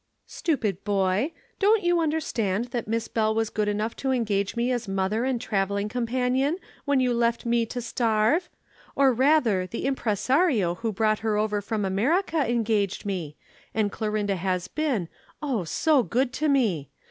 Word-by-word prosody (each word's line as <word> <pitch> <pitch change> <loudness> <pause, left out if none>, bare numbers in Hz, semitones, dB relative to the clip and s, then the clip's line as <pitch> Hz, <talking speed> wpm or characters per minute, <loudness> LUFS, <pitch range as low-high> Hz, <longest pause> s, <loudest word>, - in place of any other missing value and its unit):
"Stupid 220 - -2
boy! 200 - +1 0.3
Don't 420 +1 +4
you 350 0 +3
understand 245 - -1
that 240 -4 -3
Miss 225 +1 -1
Bell 220 -1 0
was 225 -1 0
good 210 -1 -1
enough 210 +2 -1
to 270 - -2
engage 210 -6 0
me 240 +2 0
as 240 -3 -2
mother 195 +4 0
and 260 -2 0
travelling 200 -2 -1
companion 250 +6 0 0.3
when 285 -2 +2
you 250 -1 +2
left 235 0 0
me 235 -1 +1
to 245 - -4
starve? 230 - +1 0.5
Or 270 -2 +4
rather, 240 -8 +3
the 230 - -5
impresario 255 - +1
who 225 +5 -3
brought 215 +1 +1
her 220 -2 0
over 210 -1 0
from 210 0 -2
America 285 - +1
engaged 215 -5 0
me, 175 -7 -4 0.4
and 210 -2 +1
Clorinda 210 -2 -1
has 185 0 -1
been, 270 - -1 0.3
oh, 260 - -2
so 295 - +3
good 250 +2 0
to 305 +3 0
me! 205 - +1
225 Hz, 160 wpm, -26 LUFS, 205-260 Hz, 0.5 s, Don't